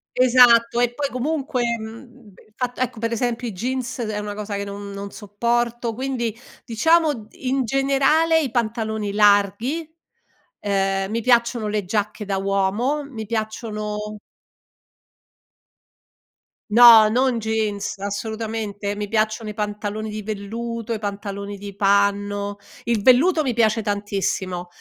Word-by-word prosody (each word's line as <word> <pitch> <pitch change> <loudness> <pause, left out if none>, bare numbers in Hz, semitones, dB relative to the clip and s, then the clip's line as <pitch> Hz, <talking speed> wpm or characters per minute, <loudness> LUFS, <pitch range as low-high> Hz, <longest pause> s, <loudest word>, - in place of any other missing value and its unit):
Esatto, 240 -2 +5
e 240 0 +2
poi 285 +3 -2
comunque, 275 0 -2
ehm, 235 0 -6 0.2
il 215 - -30
fatto 250 0 -3
ecco 250 -3 -2
per 230 +1 -2
esempio 240 +1 -1
i - - -3
jeans, 255 +6 -3
ed 230 -3 -2
è 210 - -3
una 210 0 -5
cosa 205 0 -5
che 200 - -3
non 200 0 -7
non 200 0 -7
sopporto, 235 +3 -1
quindi 240 -2 -3 0.3
diciamo 290 0 +2
in 265 +1 -1
generale, 275 +6 +3
i 280 - -2
pantaloni 220 -3 -2
larghi, 210 - +2 0.7
ehm, 195 -1 0
mi 230 +1 -2
piacciono 235 -2 +2
le 210 -1 -1
giacche 210 +2 -2
da 195 -1 -2
uomo, 200 +9 0
mi 240 -6 -7
piacciono 215 -1 -4 2.5
No, 230 -1 +9
non 250 +1 +1
jeans, 215 -2 -2
assolutamente, 205 0 -4
mi 205 0 -4
piacciono 215 +1 -1
i 210 - -7
pantaloni 210 0 -3
di 215 0 -5
velluto, 225 +3 -4
i 220 - -3
pantaloni 200 0 -5
di 200 0 -9
panno, 200 0 +1 0.3
il 230 -3 0
velluto 285 - +5
mi 260 -6 -1
piace 225 -1 +2
tantissimo 200 -3 -2
220 Hz, 135 wpm, -22 LUFS, 205-240 Hz, 2.5 s, No